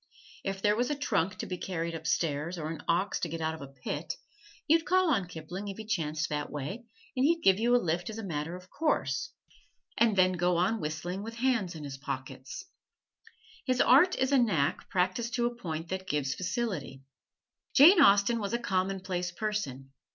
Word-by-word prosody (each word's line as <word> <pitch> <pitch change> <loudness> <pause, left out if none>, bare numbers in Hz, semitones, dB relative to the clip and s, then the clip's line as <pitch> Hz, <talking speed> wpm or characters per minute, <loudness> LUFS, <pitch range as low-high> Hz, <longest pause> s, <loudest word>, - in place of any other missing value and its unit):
If 195 0 -4
there 210 0 +4
was 245 +2 0
a 295 - 0
trunk 200 - 0
to - - -5
be 180 -1 -5
carried 170 -2 -3
upstairs, 165 +1 -1
or 155 -1 -4
an 165 - -6
ox 180 +4 +1
to 170 - -2
get 165 +1 -4
out 160 0 -1
of 160 - -9
a 140 - -7
pit, 135 -1 -5 0.5
you'd 325 +1 +4
call 370 -1 +3
on 195 -8 0
Kipling 175 +4 -7
if 195 - -6
he 220 - -7
chanced 160 -6 -1
that 150 -1 -2
way, 150 - -5 0.3
and 255 - +1
he'd 330 +3 +3
give 190 +1 +5
you 240 +2 +3
a - - +7
lift 175 -3 -1
as 220 - -6
a 225 - -5
matter 165 -2 -3
of 180 +1 -13
course, 325 +8 0 0.7
and 225 -3 +4
then 185 -1 +5
go 175 -1 +1
on 185 +5 +1
whistling 160 +5 -3
with 225 +2 -7
hands 230 -8 0
in 155 - -7
his 135 -1 -7
pockets. 135 - -6 1.0
His 255 -1 +1
art 320 +9 +6
is 260 +1 0
a 275 - +5
knack 165 - +1
practised 190 +6 0
to 240 -1 +1
a 240 - 0
point 165 -7 -5
that 190 0 -4
gives 140 -3 0
facility. 180 - -3 0.7
Jane 335 +6 +9
Austen 205 0 +5
was 200 -1 -3
a - - +3
commonplace 185 -3 -1
person. 170 -10 -3
185 Hz, 195 wpm, -30 LUFS, 160-235 Hz, 1.0 s, Jane